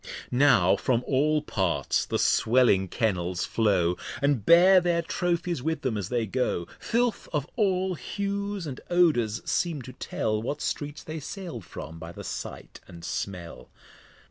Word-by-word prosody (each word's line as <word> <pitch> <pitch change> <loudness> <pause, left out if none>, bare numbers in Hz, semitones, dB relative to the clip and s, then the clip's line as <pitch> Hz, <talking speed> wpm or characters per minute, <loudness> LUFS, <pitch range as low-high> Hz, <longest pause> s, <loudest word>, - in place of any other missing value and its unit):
Now 125 -9 +5
from 125 -1 +1
all 150 +3 +2
Parts 85 - 0
the - - 0
swelling 110 -5 +3
Kennels 90 -4 -1
flow, 95 -6 +1 0.2
And 140 -6 +1
bear 180 - +7
their 170 -1 +1
Trophies 175 -2 -1
with 160 +1 -2
them 130 -4 0
as 100 -3 -3
they 120 -2 0
go: 110 -6 -1
Filth 240 0 0
of 150 -2 -1
all 190 -4 +1
Hues 200 +1 -3
and 135 -4 -6
Odours 150 -12 +2
seem 165 -6 -1
to 130 - -10
tell 110 -1 -2
What 140 +6 -3
Streets 145 +1 -4
they 155 0 -6
sail'd 150 - -7
from, 80 +3 -8
by 85 +1 -8
the 100 +3 -9
Sight - - -7
and 85 -1 -11
Smell. 90 -3 -5
130 Hz, 150 wpm, -27 LUFS, 100-170 Hz, 0.2 s, bear